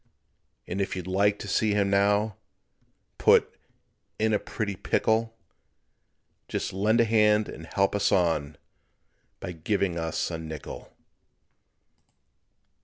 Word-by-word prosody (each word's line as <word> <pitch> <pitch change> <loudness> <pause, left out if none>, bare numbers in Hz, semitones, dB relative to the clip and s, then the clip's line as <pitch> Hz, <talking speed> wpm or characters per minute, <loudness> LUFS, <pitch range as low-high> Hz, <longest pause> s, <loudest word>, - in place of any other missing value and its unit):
And 95 +3 -3
if 95 - -2
you'd 90 -2 -5
like 100 +2 +2
to 105 - -8
see 105 +1 +1
him 100 -1 +1
now 100 +1 +2 0.8
Put - - +4 0.6
"in 110 0 +1
a 105 - +2
pretty 100 -2 -4
pickle," 110 +4 0 1.1
Just - - -3
lend 105 +4 +2
a 115 - +5
hand 105 -1 +3
and 80 +1 -9
help 100 +3 +1
us 100 -1 +1
on 80 -5 +1 0.8
By 90 - -5
giving 90 +1 -1
us 80 +1 -2
a 80 - -4
nickel. 80 -2 -8
100 Hz, 120 wpm, -27 LUFS, 90-105 Hz, 1.1 s, a